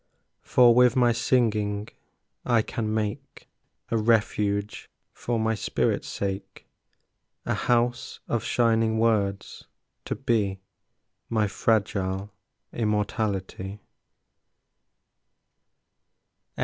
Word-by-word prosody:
For 120 -2 +5
with 125 0 +5
my 125 -2 +4
singing 110 -4 0 0.6
I 120 -3 +2
can 110 -1 -3
make 105 -1 -4 0.4
A 115 - +2
refuge 105 -2 0 0.2
for 120 -1 -2
my 110 0 +1
spirit's 110 - -1
sake, 100 -1 -5 0.8
A - - 0
house 120 0 0
of 115 - -1
shining 115 -2 +2
words, 105 -3 0 0.4
to - - -2
be 100 -5 0 0.7
My 110 -2 +1
fragile 100 -2 -1 0.4
immortality. 105 -2 -2
110 Hz, 85 wpm, -26 LUFS, 100-115 Hz, 0.8 s, For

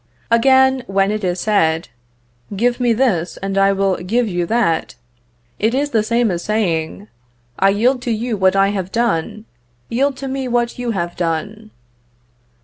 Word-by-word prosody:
Again, 265 +2 +4
when 195 +1 +1
it 215 -1 -3
is 180 -1 -1
said, 165 -6 +1 0.7
"Give 240 +5 +1
me 245 -1 +2
this, 215 -8 0
and 195 0 -2
I 195 0 +4
will 195 -1 0
give 230 +7 0
you 175 -3 -2
that," 220 -8 0 0.6
it 225 +4 +1
is 290 +2 -1
the 225 - +2
same 230 0 +1
as 175 -1 -3
saying, 195 -2 -2 0.5
"I 195 - +4
yield 240 +6 +1
to 245 - -2
you 230 +1 -2
what 190 -1 +2
I 195 0 +3
have 190 -2 -3
done, 215 -2 -1 0.4
yield 270 +3 0
to 270 - -6
me 265 0 -3
what 240 0 -1
you 245 -1 -3
have 175 -5 -3
done." 200 +6 -3
215 Hz, 165 wpm, -18 LUFS, 190-240 Hz, 0.7 s, Again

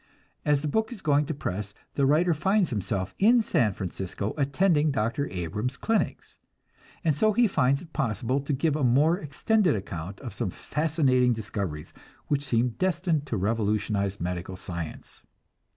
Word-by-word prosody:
As 145 -1 +2
the - - 0
book 220 - 0
is 225 -5 -9
going 145 -1 +3
to - - -2
press, 100 -5 -4 0.2
the 140 -1 +2
writer 165 +5 +4
finds 190 +3 +1
himself 100 -3 -2
in 230 +3 +5
San 115 - +2
Francisco, 95 +1 -4
attending 155 +2 +2
Dr. 135 +2 0
Abrams' 105 - -3
clinics; 225 -1 -1 0.6
and 155 -4 +2
so 215 +8 +3
he 240 +2 +4
finds 140 -4 +2
it 160 - -16
possible 125 -1 0
to 140 +2 -4
give 145 +2 +1
a 150 - -1
more 145 +8 +4
extended 175 - +1
account 95 -1 -6
of 125 -4 -7
some 115 -6 -2
fascinating 135 - +1
discoveries, 100 -8 -4 0.4
which 145 -1 +1
seem 120 -1 +2
destined 170 -5 0
to 115 - -1
revolutionize 100 -1 0
medical 90 +1 -3
science. 85 -3 -7
135 Hz, 155 wpm, -27 LUFS, 105-155 Hz, 0.6 s, in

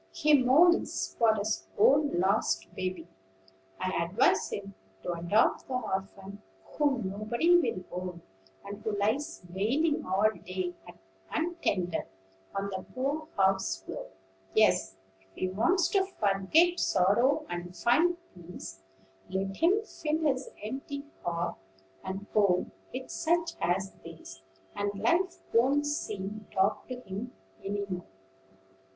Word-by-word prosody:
He 305 -1 +2
mourns 315 +8 +4
for 225 -1 +5
his 210 0 -2
own 305 - +4
lost 185 - +2
baby: 185 -3 -4 0.7
I 185 -2 0
advise 200 +10 +2
him 200 0 -5 0.3
to - - -2
adopt 175 +6 +2
the 260 - -3
orphan 195 -3 -4 0.2
whom 270 -8 0
nobody 235 - +2
will 185 - -1
own, 180 -1 -5 0.4
and 200 +1 -7
who 215 -2 -2
lies 220 +4 -1
wailing 275 - +1
all 200 +4 +3
day 185 -1 -3 0.6
untended 205 - -1 0.5
on 200 0 -2
the 190 -1 -4
poor 285 +5 -1
house 190 - +2
floor. - - -6 0.5
Yes: 95 - +3 0.2
if 95 - -29
he 185 - -1
wants 315 - +2
to 390 -1 +3 0.2
forget 215 - +3
sorrow 220 +10 +3
and 175 0 -6
find 330 +9 +3 0.2
peace, 165 - -10 0.5
let 195 +1 -2
him 390 +6 +3
fill 310 -7 -2
his 270 -3 +1
empty 275 +5 -5 0.2
heart 170 0 -2 0.5
and 190 +2 -5
home 200 -4 +3 0.2
with 255 +1 -6
such 335 0 +1
as 185 +3 0
these, 160 -13 -11 0.3
and 205 0 -2
life 345 - +1
won't 270 +5 +4
seem 210 -8 -4
dark 190 +1 +1
to 250 -1 -6
him 200 +3 -6 0.3
any 200 +1 -2
more." 180 -2 -4
205 Hz, 125 wpm, -30 LUFS, 185-285 Hz, 0.7 s, for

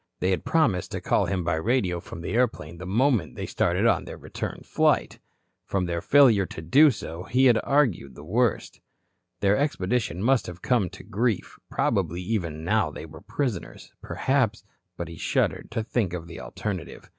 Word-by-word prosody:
They 95 - +1
had 95 - 0
promised 140 - +1
to - - -2
call - - +1
him 95 -2 -1
by 80 - 0
radio 95 -2 0
from 85 - -9
the - - -4
airplane 110 -9 -1
the 90 - -7
moment 120 +2 +1
they - - -4
started - - 0
on - - +3
their - - -8
return - - -6
flight. - - +1 0.4
From 95 -2 -1
their 85 -1 -2
failure 120 -9 +5
to - - -8
do 145 - +6
so 85 - -5
he 130 +5 +4
argued 110 - +1
the 75 - -11
worst. 115 +7 0 0.6
Their 100 +1 +4
expedition 105 - -1
must 130 +1 +3
have 90 0 -9
come 115 -8 +2
to - - -12
grief, 115 0 -2
probably 90 -2 0
even 85 -7 -2
now 100 -1 +2
they 75 - -8
were 80 0 -12
prisoners, 115 - -4
perhaps 125 -6 0 0.3
But 85 - -4
he 85 0 -9
shuddered - - 0
to 115 -1 -2
think 110 -5 -1
of 85 -2 -5
the 85 0 -9
alternative. 95 -5 -6
100 Hz, 180 wpm, -26 LUFS, 85-125 Hz, 0.6 s, do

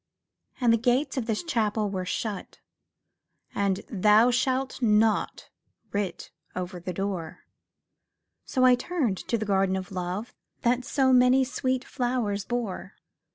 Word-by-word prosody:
And 240 -3 +4
the 230 - +2
gates 250 +5 +1
of 250 -4 -2
this 220 +4 -1
Chapel 220 -9 0
were 185 -2 -3
shut, 210 -2 -4 1.0
And 200 -1 0
'Thou 215 +3 +4
shalt 260 +2 0
not' 220 -1 +2 0.4
writ 200 -3 -3 0.2
over 180 0 -4
the 180 +1 -5
door; 185 -3 -4 1.0
So 255 -1 +1
I 255 - +7
turned 250 - -1
to 235 - -1
the 215 - -3
Garden 195 -2 +2
of 190 0 -5
Love 185 +4 -4 0.3
That 245 +1 +1
so 265 -2 +2
many 250 +1 +5
sweet 260 0 -1
flowers 240 -6 -1
bore. 240 -6 -4
220 Hz, 135 wpm, -27 LUFS, 195-250 Hz, 1.0 s, I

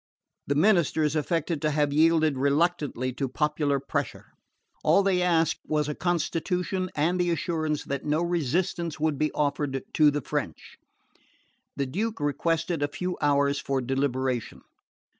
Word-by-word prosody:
The 140 - 0
ministers 160 -3 +3
affected 160 0 -1
to 155 - +1
have 145 -1 +1
yielded 155 -1 +4
reluctantly 140 -2 0
to 135 +1 -3
popular 150 0 0
pressure. 135 - -4 0.5
All 200 - +4
they 190 -2 +2
asked 165 -2 +2
was 150 -1 0
a 150 - -2
constitution 180 +2 -1
and 170 +5 +1
the 175 0 +1
assurance 160 -2 -1
that 140 -1 -4
no 155 +3 0
resistance 170 0 -1
would 155 -2 0
be 155 0 +1
offered 145 -2 -1
to 150 -1 +5
the 145 0 -1
French. - - -5 1.0
The 140 - -1
Duke 210 +11 -3
requested 160 +3 -1
a 145 - +2
few 180 +5 -4
hours 140 -1 +2
for 135 -1 -1
deliberation. 130 -2 -2
150 Hz, 140 wpm, -26 LUFS, 140-170 Hz, 1.0 s, to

